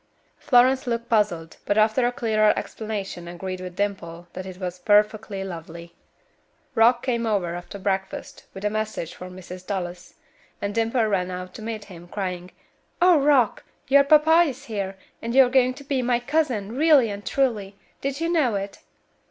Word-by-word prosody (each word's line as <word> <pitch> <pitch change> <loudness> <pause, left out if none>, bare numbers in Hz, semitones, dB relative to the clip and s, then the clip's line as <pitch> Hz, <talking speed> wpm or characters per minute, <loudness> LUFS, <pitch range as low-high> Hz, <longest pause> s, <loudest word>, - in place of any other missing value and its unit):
Florence 260 0 +4
looked 235 0 -2
puzzled, 205 -8 0
but 205 - 0
after 220 +3 +3
a - - 0
clearer 215 -3 +2
explanation 200 -5 -5
agreed 185 +1 -6
with 180 -1 -7
Dimple 175 -4 -3
that 185 +1 -6
it 185 -1 -8
was 180 -1 -5
"perfectly 210 0 +2
lovely." 170 -2 -8 0.8
Rock 240 0 +4
came 235 -3 -1
over 190 -6 0
after 175 +3 -7
breakfast, 190 0 -3
with 195 +2 -7
a 210 - +1
message 215 -6 -3
for 180 - -9
Mrs. 180 0 -10
Dallas, 180 -3 -5 0.4
and 200 0 -3
Dimple 230 +1 +1
ran 190 -4 0
out 180 0 -6
to - - -9
meet 220 -1 -5
him, 175 -3 -12
crying, 180 -2 -4 0.5
"Oh, 350 -3 +6
Rock! 275 -5 +3 0.3
your 280 +1 +7
papa 310 +3 +6
is 270 +1 -9
here, 195 -4 -4 0.2
and 230 +2 -3
you 265 -1 +8
are - - -2
going 255 0 +3
to 280 - -11
be 275 -2 -1
my 245 -1 +1
cousin, 245 -6 -1
really 285 -6 +5
and 200 0 -7
truly. 215 -8 -1 0.3
Did 275 +1 -2
you 330 - 0
know 300 -10 +2
it?" 195 0 -4
210 Hz, 175 wpm, -24 LUFS, 185-245 Hz, 0.8 s, you